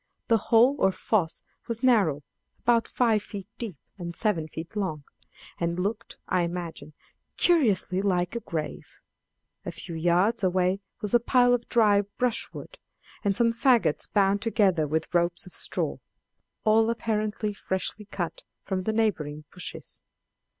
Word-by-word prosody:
The 230 - +5
hole 240 +4 +6
or 190 - +4
foss 185 -4 -1 0.2
was 230 0 -4
narrow, 195 - +3 0.3
about 235 -1 +2
five 225 -4 +2
feet 200 -2 -8
deep 215 - -5 0.2
and 170 -1 -5
seven 175 -8 0
feet 160 +5 -8
long, 185 -8 -2 0.6
and 170 0 -1
looked, 210 +5 -3
I 180 - +2
imagined, 170 -3 -5 0.4
curiously 220 - +3
like 180 -1 0
a - - 0
grave. 155 -8 -6 0.6
A - - -4
few 170 - -9
yards 175 +7 +2
away 185 +1 +2 0.2
was 210 - -1
a 240 - +7
pile 245 +1 +4
of 240 -1 -1
dry 210 -4 +4 0.2
brushwood, 250 - -2 0.4
and 200 -1 +1
some 230 +2 +3
faggots 235 - +2
bound 200 -1 +3
together 200 -9 +2
with 160 +3 -2
ropes 175 +1 +1
of 185 - -13
straw, - - -2 0.7
all 220 +1 +4
apparently 215 -2 -1
freshly 195 +2 -3
cut 180 -4 -4 0.2
from 190 -1 -2
the 220 - 0
neighboring 155 -10 0
bushes. 180 - -7
200 Hz, 145 wpm, -27 LUFS, 175-230 Hz, 0.7 s, a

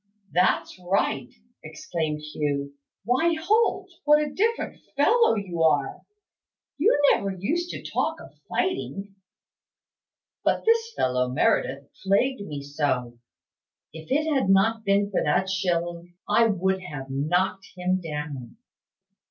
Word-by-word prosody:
"That's 180 +1 +1
right," 175 -8 0 0.3
exclaimed 155 -1 -4
Hugh. 145 -2 -3 0.3
"Why, 320 +9 +2
Holt, 390 +1 +2 0.2
what 300 +1 +6
a 300 -1 -2
different 455 +6 -1 0.2
fellow 445 - +4
you 185 -5 -3
are! 150 -4 +2 0.8
You 450 - +4
never 200 - +1
used 290 - -2
to - - -6
talk - - -1
of - - -13 0.2
fighting." 205 - -2 1.3
"But - - +1
this 460 0 +3
fellow 125 0 +1
Meredith 135 +2 +1
plagued 205 +6 +1
me 145 -8 -6
so! 130 -5 -2 0.7
If 160 0 -10
it 305 +3 +2
had 265 -9 +1
not 220 +4 +3
been 200 0 +2
for 190 - +1
that 180 +6 +1
shilling, 175 -2 -2
I 230 - +4
would 190 -2 0
have 145 -7 -7
knocked 175 +8 0
him 185 +1 0
down. 150 - -6
185 Hz, 125 wpm, -25 LUFS, 150-245 Hz, 1.3 s, what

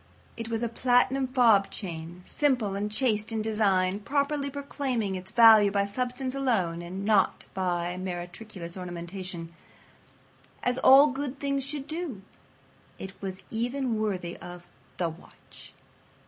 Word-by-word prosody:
It 230 0 -6
was 230 0 -2
a - - +1
platinum 250 +3 +2
fob 230 -7 +4
chain 170 -2 -6
simple 250 -9 +1
and 205 +1 -2
chaste 215 -2 +1
in 220 -1 -1
design, 200 -3 +1
properly 280 +4 -1
proclaiming 270 -7 -2
its 185 0 -7
value 220 -3 +8
by 200 0 +1
substance 250 +4 -3
alone 210 -12 0
and 185 +3 -6
not 210 -3 +2
by 175 -1 -1
meretricious 180 0 -6
ornamentation—as 180 +6 -7
all 275 +3 +8
good 275 +1 -4
things 275 -1 -1
should 280 0 -5
do. 310 - -5 0.7
It 190 0 -7
was 190 -1 -6
even 245 +2 -1
worthy 185 -5 -2
of 175 0 -10 0.3
The 175 -2 0
Watch. 165 +2 -15
215 Hz, 130 wpm, -28 LUFS, 185-255 Hz, 0.7 s, value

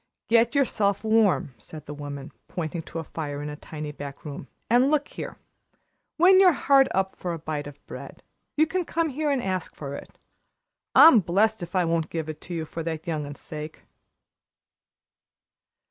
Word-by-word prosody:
"Get 230 +3 +4
yourself 205 -7 +1
warm," 220 - +3
said 150 +8 -11
the 145 - -7
woman, 145 -1 -7 0.2
pointing 165 -1 -4
to 165 - -9
a 165 - -3
fire 145 -2 -5
in 150 - -4
a - - -6
tiny 150 0 -7
back 140 -1 -9
room. 140 -2 -7 0.2
"And, 245 +4 +4
look 295 -1 +1
here, - - -7 0.8
when 370 +3 +7
you're 370 -3 +7
hard 275 -2 +4
up 190 0 -1
for 175 -1 -4
a - - -4
bite 155 -2 -4
of 145 0 -13
bread, - - -10 0.3
you 310 - +5
can 360 +3 -1
come 330 -1 -1
here 300 +2 -1
and 275 -3 0
ask 185 -2 -3
for 140 -2 -6
it. - - -9 0.8
I'm 320 -8 +9
blest 205 +4 +1
if 175 +2 -7
I 180 -2 +3
won't 165 -1 0
give 160 -2 -4
it 155 -1 -7
to 175 - -6
you 160 -1 -2
for 165 - -6
that 160 -1 -4
young 155 -3 -2
un's 145 -1 -9
sake." 155 0 -8
170 Hz, 185 wpm, -26 LUFS, 150-235 Hz, 0.8 s, I'm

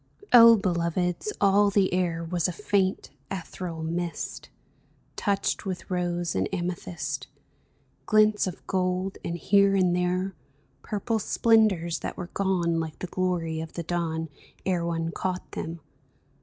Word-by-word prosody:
O 230 -1 +10
beloveds, 180 - -1
all 200 +1 +4
the 195 -2 +2
air 175 -2 0
Was 175 +1 0
a - - -2
faint, 195 +1 0 0.2
ethereal 170 -2 -5
mist 170 +1 -4 0.7
Touched 200 -2 0
with 190 -2 -5
rose 175 -2 -1
and - - 0
amethyst 175 -1 -3 0.4
— - - -40
Glints 215 -2 +4
of 180 - -7
gold, 185 0 -1
and 170 - -3
here 200 +2 +4
and 180 -2 +3
there 180 +2 0 0.5
Purple 220 +1 -2
splendors 210 -7 +3
that - - -5
were 175 0 -6
gone, 175 -4 +1
Like 160 -1 -4
the - - -5
glory 175 -3 -1
of 160 - -8
the 170 - -4
dawn. 165 -1 -2 0.4
Ere 180 -3 +1
one 165 -1 -1
caught 185 +1 -4
them. 165 0 -5
180 Hz, 140 wpm, -27 LUFS, 170-195 Hz, 0.7 s, O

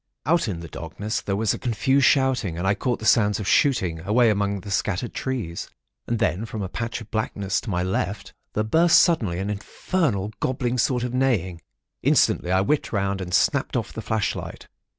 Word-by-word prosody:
"Out 165 -1 +2
in 90 -6 -4
the 85 - -7
darkness 95 +8 -4
there 100 - -2
was 110 0 +1
a - - -5
confused 130 +3 +2
shouting, 130 - +2
and 90 - -3
I 95 - +3
caught 120 +4 -1
the 110 - -8
sounds 105 -3 +4
of 100 - -4
shooting, 95 - +2
away 110 +7 +3
out - - +4
among 100 -1 -1
the 100 +2 -8
scattered 100 +3 -1
trees. 115 -11 -4 0.4
And 120 - 0
then, 110 -2 0
from 105 -1 -5
a 95 - -4
patch 115 +4 -4
of 110 - -12
blackness 100 -3 -1
to - - -7
my 90 -2 0
left, 95 +2 -3 0.2
there 105 - 0
burst 160 +10 +4
suddenly 115 - +3
an 100 +3 -2
infernal 105 - -1
gobbling 125 -1 -1
sort 125 0 +1
of 125 0 -3
neighing. 105 -10 0 0.4
Instantly 90 - +2
I 95 +1 +3
whipped 145 +9 0
round 100 -2 -1
and 90 -1 -6
snapped - - +2
off - - -4
the - - -5
flashlight. 110 -2 -3
105 Hz, 200 wpm, -24 LUFS, 95-125 Hz, 0.4 s, sounds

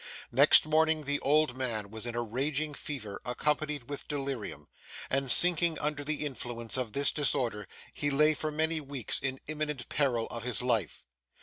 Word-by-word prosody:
Next 140 +6 +8
morning, 155 0 +1
the 145 0 +1
old 150 -2 +1
man 110 -6 -4
was 110 +2 -6
in 120 - -5
a 120 - -1
raging 140 +6 -2
fever 120 -9 -6
accompanied 150 +1 -2
with 145 -1 -7
delirium; 135 - -5 0.4
and 135 0 0
sinking 170 +1 +4
under 150 -1 -3
the 150 +1 -1
influence 120 -4 -6
of 125 -5 -3
this 140 0 +2
disorder 125 - -2 0.3
he 145 - -1
lay 150 +2 +4
for 155 +1 -4
many 160 +1 +1
weeks 140 -4 -1
in 130 0 -3
imminent 150 -4 -5
peril 125 -6 0
of 120 - -6
his 125 +1 -1
life. 115 -9 -1
140 Hz, 170 wpm, -29 LUFS, 120-150 Hz, 0.4 s, Next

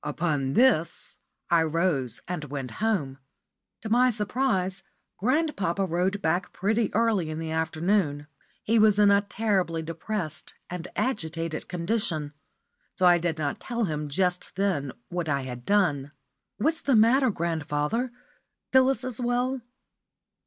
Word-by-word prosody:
Upon 145 -6 -1
this 235 - +2 0.3
I 170 -1 +5
rose 155 -7 0
and 155 -5 -4
came 135 -2 -4
home. 145 - -1 0.6
To 220 - -4
my 250 +3 +5
surprise, 210 -4 -1 0.4
grandpapa 205 - +1
rowed 185 +3 -1
back 175 +4 0
pretty 215 +2 0
early 215 -7 +2
in 155 - -4
the 160 0 -4
afternoon. 160 -1 0 0.4
He 225 +1 +3
was 215 -1 +5
in 205 -1 +6
a 200 0 +5
terribly 195 -6 -1
depressed 165 0 -4 0.2
and 180 -1 -5
agitated 165 -9 -2
condition, 170 -5 -1 0.6
so 185 - +2
I 175 -1 +6
did 165 -2 -1
not 145 -2 -2
tell 235 -2 -2
him 150 -5 -2
just 180 +4 -1
then 185 -9 0 0.2
what 175 -2 -3
I 140 -1 +1
had 125 -2 -7
clone. 150 -9 +2 0.4
"What's 315 +8 +1
the 275 - +2
matter, 245 +4 +5
grandfather? 165 - -1 0.6
Phyllis 260 -2 +4
is 255 -1 -3
well?" 245 +2 0
180 Hz, 135 wpm, -27 LUFS, 155-220 Hz, 0.6 s, in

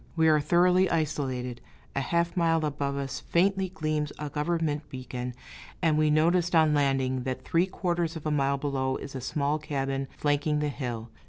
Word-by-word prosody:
We 160 -1 +3
are 155 -1 +5
thoroughly 180 +4 +4
isolated; 130 -6 -2 0.3
a 135 - +1
half 170 +4 0
mile 165 -2 +2
above 140 -1 -2
us, 135 -2 -3
faintly 190 +2 +1
gleams 155 -4 -2
a 150 -1 -5
government 150 -1 -1
beacon, 125 -1 -5 0.4
and 160 -3 +2
we 155 0 +3
noticed 170 +3 +3
on 160 -2 +5
landing 135 -3 +1
that 130 0 -4
three 170 +3 +2
quarters 175 -3 -1
of 160 - -7
a 155 - 0
mile 140 -1 +2
below 135 -2 -1
is 140 - -7
a 130 - -5
small 145 +3 0
cabin 135 -2 -2
flanking 145 +1 +1
the 150 0 0
hill. 120 -5 -5
150 Hz, 175 wpm, -28 LUFS, 135-165 Hz, 0.4 s, are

